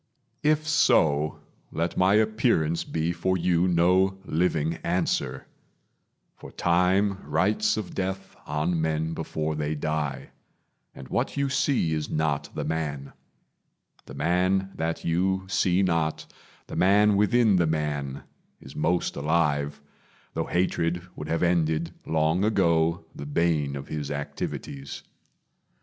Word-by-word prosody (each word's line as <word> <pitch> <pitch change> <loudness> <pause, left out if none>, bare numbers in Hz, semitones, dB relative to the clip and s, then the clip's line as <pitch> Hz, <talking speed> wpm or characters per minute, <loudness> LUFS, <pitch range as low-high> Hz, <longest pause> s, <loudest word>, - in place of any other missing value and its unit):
If 155 +1 +2
so, 75 - +3 0.3
let 85 +1 -2
my 95 +2 +4
appearance 110 -7 +2
be 80 +1 -1
for 95 +2 0
you 90 0 +2
No 90 +2 +3
living 80 -2 0
answer; 65 +1 -1 0.9
for - - -11
Time 95 +3 +2
writes 95 +10 +1
of 105 -4 -5
death 95 0 -4
On 80 +3 0
men 80 0 -1
before 80 -1 -3
they 75 0 -2
die, 75 -2 -3 0.6
and 65 - -10
what 125 +3 -1
you 140 0 +1
see 135 - +1
Is 75 -1 -2
not 75 -2 -1
the - - -2
man. 75 -4 -3 0.9
The - - -9
man 95 +2 +1
that 80 +1 -3
you 95 +3 +1
see 95 0 +2
not 80 -4 0 0.4
The - - -8
man 100 +3 +4
within 105 0 +4
the 85 -2 +2
man 75 -3 -2 0.4
is 65 - -13
most 85 +3 0
alive; 75 -2 0 0.5
Though - - -2
hatred 85 -1 0
would 75 - -6
have 80 +2 0
ended, 80 -2 +1
long 80 +3 +1
ago, 85 -6 +2
The 70 - -7
bane 75 -2 +1
of 70 -1 -7
his 75 -2 -4
activities. 70 -1 -5
85 Hz, 130 wpm, -26 LUFS, 75-95 Hz, 0.9 s, my